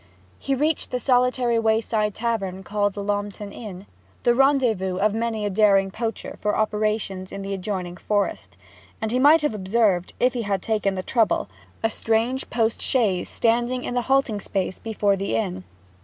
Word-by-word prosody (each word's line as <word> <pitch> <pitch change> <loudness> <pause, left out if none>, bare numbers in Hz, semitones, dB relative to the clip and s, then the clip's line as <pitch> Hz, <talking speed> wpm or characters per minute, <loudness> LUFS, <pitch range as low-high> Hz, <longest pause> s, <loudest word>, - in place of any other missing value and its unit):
He 275 - -1
reached 300 +3 0
the 250 - -2
solitary 250 -2 +2
wayside 220 -1 +1
tavern 195 -5 -2
called 205 +1 -1
Lornton 205 0 -3
Inn 195 -4 -8 0.4
the 240 - +4
rendezvous 240 -9 +2
of 205 +2 +2
many 225 -1 -1
a - - 0
daring 195 -1 +4
poacher 225 +1 -4
for 210 0 0
operations 210 -3 -1
in 195 0 -6
the 195 0 -3
adjoining 185 -2 -4
forest; 145 - -2 0.4
and 220 0 -2
he 250 - +1
might 300 +4 +6
have 295 - +1
observed, 195 -2 +1
if 250 0 +3
he 245 - -2
had 200 -3 -2
taken 210 -3 0
the 185 - -3
trouble, 225 - +1 0.3
a 225 - +3
strange 230 +5 0
post 225 -1 0
chaise 210 -9 +1
standing 240 +2 +1
in - - -3
the 245 - +1
halting 265 -6 +2
space 190 -2 -3
before 210 -3 +1
the 195 -10 -2
inn. 95 -4 -2
215 Hz, 170 wpm, -24 LUFS, 195-235 Hz, 0.4 s, might